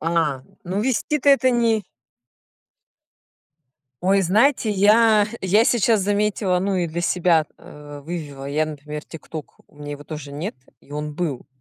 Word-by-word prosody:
А, 160 -5 0 0.2
ну, 190 +4 -2
вести-то 265 +4 +1
это 270 -2 +4
не 230 -3 +2 2.2
Ой, 195 +2 +3
знаете, 220 +5 +3
я 210 +1 +5
я 200 +4 +3
сейчас 225 -3 +3
заметила, 205 -2 +1
ну 195 +1 0
и 175 -2 0
для 165 +1 -4
себя 170 -2 +2
вывела: 145 -1 -8
я, 145 +3 0
например, 150 0 -7
TikTok, 160 -1 -8 0.2
у - - -26
меня 145 0 -8
его 145 0 -9
тоже 150 -2 -8
нет, 160 +9 -5 0.3
и 145 - -17
он 150 0 -4
был. 155 -6 -3
175 Hz, 140 wpm, -22 LUFS, 150-210 Hz, 2.2 s, я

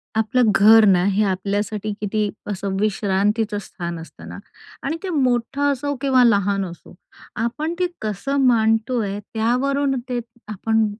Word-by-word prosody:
आपलं 225 +1 +2
घर 220 +2 +7
ना, 185 -3 +4
हे 200 +1 +2
आपल्यासाठी 205 +2 -2
किती 210 0 -1 0.2
असं 200 -1 -3
विश्रांतीचं 210 +1 0
स्थान 170 -3 -6
असतं 160 -2 -12
ना - - -8 0.5
आणि 320 - -2
ते 380 - -3
मोठं 275 -1 +1
असो 285 +1 -2
किंवा 265 -3 +4
लहान 200 -3 +2
असो, 170 -2 -11 0.4
आपण 295 +9 -2
ते 360 - +2
कसं 215 +6 -3
मांडतोय, 225 -2 +1
त्यावरून 265 +4 0
ते 245 -1 -1 0.3
आपण 220 +2 0
220 Hz, 135 wpm, -21 LUFS, 200-250 Hz, 0.5 s, घर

